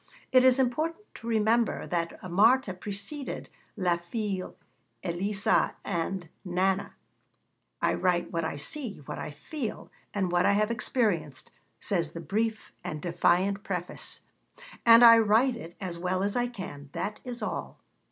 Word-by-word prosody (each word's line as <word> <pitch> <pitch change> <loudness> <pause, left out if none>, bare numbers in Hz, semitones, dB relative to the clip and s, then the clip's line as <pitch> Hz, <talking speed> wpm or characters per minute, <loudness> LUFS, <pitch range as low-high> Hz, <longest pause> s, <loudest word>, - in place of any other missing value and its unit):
It 255 -1 +6
is 260 0 +6
important 310 - 0
to 230 - -10
remember 225 +1 +2
that 170 +1 -3
Marthe 200 +1 +3
preceded 205 +9 -5 0.3
La 180 -3 +2
Fille 190 +2 -4 0.5
Elisa 195 +4 +1
and 175 +1 -2 0.2
Nana. 190 +1 0 0.9
'I - - +3
write 180 -2 +1
what 165 -1 -1
I 160 - -2
see, 215 - -4
what - - -6
I - - -4
feel, 220 - -6 0.2
and 190 -3 -1
what 175 0 +3
I 200 - +5
have 210 +2 +2
experienced,' 200 - -1 0.3
says 170 -6 -1
the 170 - -6
brief 215 +6 -2
and 155 - -4
defiant 180 +4 +1
preface, 180 -3 -4 0.7
'and 230 +1 +9
I 230 -1 +10
write 225 +4 +4
it 170 -7 -10
as 175 -3 -5
well 185 +1 0
as 200 0 -1
I 245 0 +2
can: 165 - -8
that 210 - -3
is 245 -2 -6
all. - - -4
200 Hz, 145 wpm, -28 LUFS, 175-230 Hz, 0.9 s, I